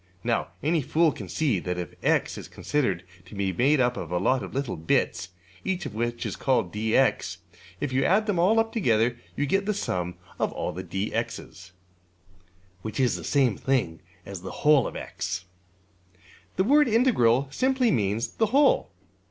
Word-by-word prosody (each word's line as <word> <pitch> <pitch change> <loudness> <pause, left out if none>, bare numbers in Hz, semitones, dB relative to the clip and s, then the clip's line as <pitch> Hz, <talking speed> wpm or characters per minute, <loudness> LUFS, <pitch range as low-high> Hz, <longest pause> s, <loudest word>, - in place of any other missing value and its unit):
'' 90 - -34
Now 115 -1 0 0.2
any 160 +2 +2
fool 160 +4 +2
can - - -8
see 135 - +1
that 90 0 -3
if 90 - -5
$x$~is - - 0
considered 100 - -1 0.2
as 90 - -18
made 100 - +2
up 125 -1 +2
of 85 - -6
a 90 - +1
lot 130 +9 +2
of - - -7
little 135 -2 -2
bits, 90 +3 0 0.3
each 190 0 -2
of - - -5
which 120 +2 -2
is - - -3
called~$dx$, 110 +1 +1 0.4
if 140 -3 -3
you 135 +1 +2
add 210 +3 +3
them 205 -5 0
all 205 +6 +4
up 225 0 0
together 120 - +2 0.2
you 145 - 0
get 195 +7 0
the 210 - +1
sum 90 - -2 0.2
of - - 0
all - - -3
the~$dx$'s, 95 0 -4 1.1
(which 110 +4 -5
is 125 -2 +2
the - - -6
same 130 -7 +2
thing 120 - 0 0.3
as 100 -3 -7
the 95 - -8
whole 150 -3 +6
of~$x$). 90 - -5 1.1
The 190 - +2
word 290 +6 +5
``integral'' 140 - +3
simply 260 -2 +2
means 105 0 0
``the 220 -2 -1
whole.'' 295 - +4
130 Hz, 170 wpm, -26 LUFS, -, 1.1 s, whole